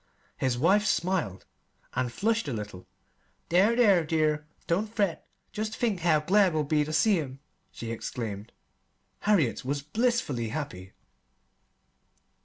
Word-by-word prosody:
His 130 -2 0
wife 190 +10 +4
smiled, 170 - -1 0.5
and 125 -2 -1
flushed 225 - 0
a 140 - -2
little. 105 -4 -7 0.6
"There, 195 +7 +4
there, 205 -8 +5
dear! 155 -1 0 0.2
don't 190 +6 0
fret. 200 -6 -1 0.2
Jest 215 +1 -4
think 220 -6 0
how 160 -3 +3
glad 190 +1 +3
we'll 155 - +2
be 150 +1 +2
ter 150 - -5
see 195 +4 +3
'em!" 135 -4 -5 0.3
she 115 -1 -6
exclaimed. 110 -2 -5 0.7
Harriet 185 - +2
was 140 +2 -2
blissfully 150 - 0
happy. 95 -9 -6
155 Hz, 130 wpm, -28 LUFS, 130-200 Hz, 0.7 s, there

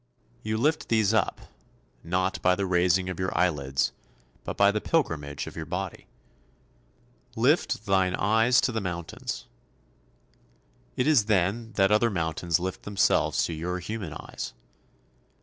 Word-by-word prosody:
You 110 0 -2
lift 150 +7 0
these 110 -2 +3
up, 110 - +1 0.6
not 90 +3 -1
by 90 0 +4
the 100 - -1
raising 90 0 +2
of 95 -1 -5
your 95 -2 -2
eyelids, 70 -7 +1 0.5
but - - -5
by 100 0 +5
the 105 0 -2
pilgrimage 75 - -1
of - - -9
your - - -6
body. - - -5 1.3
"Lift - - +2
thine 95 -2 +2
eyes 110 +4 +3
to 130 - +1
the 110 -1 -2
mountains." 85 -3 -5 1.5
It 125 - +1
is 145 -9 +4
then 110 +3 0
that 95 0 +3
other 110 +2 +4
mountains 85 -2 -1
lift 95 +1 -4
themselves 100 -1 +2
to 85 - -4
your 90 +3 -3
human 95 -3 -5
eyes. - - -7
95 Hz, 140 wpm, -27 LUFS, 85-110 Hz, 1.5 s, by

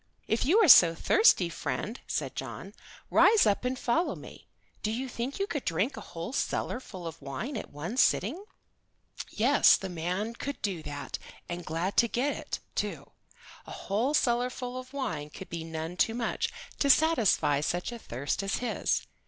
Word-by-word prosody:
"If 220 - +1
you 360 +8 +5
are - - +5
so 170 - +9
thirsty, 190 - +4
friend," 215 +7 -4
said - - -3
John, - - -7 0.4
"rise 430 0 +6
up 205 +2 +2
and 255 +1 -1
follow 320 +10 0
me. - - -12 0.3
Do 215 - -1
you 245 +4 -2
think 245 +2 -4
you 395 - 0
could 295 -8 -4
drink 185 - 0
a 220 - -7
whole 170 +5 -7
cellar 250 - -1
full 185 -8 -10
of 165 0 -7
wine 215 - -5
at 220 - -5
one 170 - -6
sitting?" 265 - +2 0.9
Yes, - - +5
the 190 - -6
man 180 +6 -3
could 275 +3 -5
do 190 -6 -2
that, 145 -2 -6 0.3
and 175 0 -5
glad 170 +5 -3
to 235 - +5
get 260 +5 0
it, - - -5 0.2
too. - - -4 0.6
A - - -9
whole 230 +9 -1
cellar 245 -2 +2
full 250 0 -6
of 255 0 -7
wine 260 - -3
would 190 - -9
be 165 -1 -4
none 160 +1 -5
too 225 - +2
much 235 -2 -1 0.3
to 280 - +2
satisfy 235 - +4
such 175 +7 -2
a 235 - -7
thirst 140 - -3
as 195 +1 -1
his. 245 - -1
220 Hz, 180 wpm, -29 LUFS, 170-255 Hz, 0.9 s, so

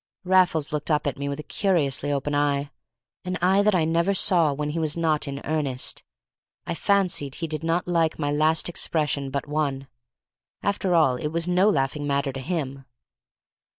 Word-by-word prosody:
Raffles 180 -5 +2
looked 150 +1 -3
up 150 -1 +1
at 140 -1 -2
me 140 0 -2
with 140 +1 -4
a - - -5
curiously 145 -8 0
open 145 +1 -1
eye, 145 0 0 0.5
an 180 0 -3
eye 190 +3 +4
that 205 -1 +3
I 165 -3 +2
never 170 +4 +1
saw 170 -6 +3
when 150 +1 -3
he 165 - -3
was 155 0 -1
not 160 -2 +1
in 140 0 -5
earnest. 145 -5 -2 0.6
I - - -2
fancied 180 -7 +1
he 165 - -4
did 155 0 -5
not 165 +2 0
like 165 -2 +1
my 145 -2 -1
last 155 +2 +2
expression 150 -5 -1
but 140 +2 -3
one. 145 -3 -1 0.8
After 195 -3 0
all, 135 -7 +4
it 150 - -3
was 165 +2 -2
no 180 +3 +4
laughing 145 -2 0
matter 140 -1 0
to 135 - -5
him. 135 -3 -4
155 Hz, 185 wpm, -25 LUFS, 140-170 Hz, 0.8 s, eye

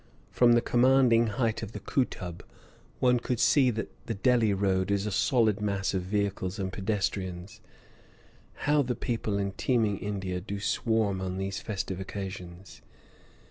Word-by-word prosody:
From 120 -1 +5
the 120 - +4
commanding 120 -2 +4
height 115 0 -1
of 110 0 -7
the - - -5
Kootub 90 -10 -2 0.6
one 125 -1 +3
could 120 0 -2
see 135 -1 +4
that 115 -1 -3 0.2
the 115 - -2
Delhi 115 0 +3
road 95 -1 +1
is 100 0 +1
a 105 - -2
solid 110 0 +2
mass 100 -2 -1
of 95 - 0
vehicles 100 0 -2
and 95 -2 -3
pedestrians 95 0 -3 1.0
(how 145 0 +4
the 125 -2 -1
people 115 -5 -2
in 100 -1 -1
teeming 110 -2 0
India 95 -3 -3
do 100 +1 -5
swarm 105 -2 0
on 95 0 -3
these 95 0 -3
festive 95 -3 -4
occasions!). 95 -2 -7
100 Hz, 150 wpm, -28 LUFS, 95-115 Hz, 1.0 s, From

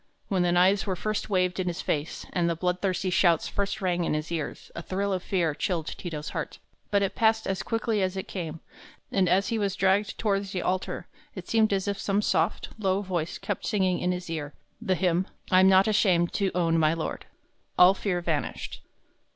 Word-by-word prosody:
When 190 -2 +1
the 175 0 +2
knives 190 +4 +3
were 190 - 0
first 215 +4 -3
waved 185 -1 +1
in 185 - -1
his 175 - -3
face, 150 +1 -2
and 170 -2 +1
the 170 - 0
bloodthirsty 180 +2 -1
shouts 175 -2 +3
first 200 0 -3
rang 175 -1 +1
in 160 - 0
his 155 +2 -4
ears, 160 -3 -4
a - - -6
thrill 195 +3 -2
of 185 - -1
fear 175 -5 0
chilled 165 0 -2
Ti 175 - -6
to's 150 -2 -5
heart; - - -4 0.3
but 200 -1 +2
it 195 - -1
passed 220 0 +2
as 190 -1 -1
quickly 225 -2 -1
as 185 0 -1
it 190 - -4
came, 165 -4 -5 0.5
and 190 -3 +2
as 190 +3 +2
he 230 - 0
was 200 -2 0
dragged 195 +2 +1
toward 200 -2 0
the 190 -2 -4
altar, 185 0 -2 0.3
it 185 -3 -8
seemed 220 -2 +3
as 195 0 0
if 200 -1 -2
some 200 +1 0
soft, - - 0
low 195 -1 +1
voice 175 -4 -2
kept 205 - -4
singing 190 -4 +1
in 180 - 0
his 180 0 -4
ear 150 -3 -5 0.3
the 190 -5 +1
hymn, 180 0 +1 0.2
"I'm 185 +1 +6
not 190 +1 +5
ashamed 185 -5 +3
to 195 -2 +1
own 165 -2 +2
my 155 0 +3
Lord." 165 - -4 0.5
All 180 +1 +8
fear 190 -3 -2
vanished. 160 -4 -3
185 Hz, 210 wpm, -27 LUFS, 175-200 Hz, 0.5 s, All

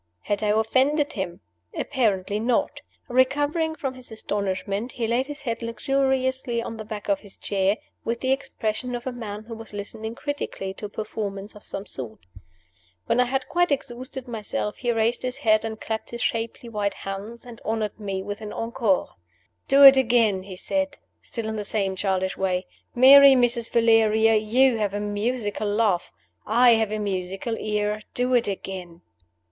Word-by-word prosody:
Had 205 0 -2
I 215 - 0
offended 265 +8 +2
him? 185 -4 -4 0.4
Apparently 210 -7 0
not. 235 +2 0 0.3
Recovering 290 +6 +1
from 275 -5 -3
his 255 -2 -12
astonishment, 200 +1 -2
he 235 - -2
laid 240 +4 +1
his 290 -1 -7
head 230 -3 -3
luxuriously 260 +1 0
on 230 -1 -5
the 220 - -6
back 215 -1 -7
of 200 -1 +2
his 200 -2 -12
chair, 195 +1 0 0.3
with 230 +1 -2
the 260 - 0
expression 250 -2 -2
of 240 - -6
a 260 - -2
man 215 -4 -6
who 230 +1 -9
was 225 -1 -9
listening 215 +2 -5
critically 285 -10 -4
to 210 - -8
a - - -18
performance 205 -1 -5
of 210 - -13
some 195 - -5
sort. 120 - -7 0.9
When 235 - +1
I 250 - +5
had 260 +1 -2
quite 350 -1 +2
exhausted 255 -1 -4
myself, 215 -2 -3
he 240 -2 0
raised 225 +1 +1
his 255 +1 -3
head 215 -6 +3
and 220 -1 -5
clapped 220 -1 -4
his 235 0 -4
shapely 230 -1 -2
white 210 -3 -2
hands, 200 +5 -7
and 240 -2 -11
honored 220 -1 -2
me 195 -2 -3
with 205 +2 -6
an 210 -1 -6
"encore." 225 -4 0 0.6
"Do 275 +1 +6
it 270 -1 +11
again," 230 -6 +3
he 190 0 -9
said, 285 +9 -2 0.2
still 230 -2 -4
in 220 0 -3
the 210 - -2
same 195 -2 -1
childish 190 -1 -1
way. 185 -1 -1 0.3
"Merry 275 +2 +9
Mrs. 240 -2 +2
Valeria, 225 -1 +4
you 230 +3 +3
have 205 -1 -1
a - - -1
musical 210 +1 -2
laugh 205 -4 +1 0.4
I 240 +2 +6
have 220 -2 +3
a 215 - -1
musical 195 +2 -3
ear. 210 0 -1
Do 250 +1 +1
it 240 -2 +3
again." 185 -3 -6
225 Hz, 175 wpm, -25 LUFS, 205-250 Hz, 0.9 s, it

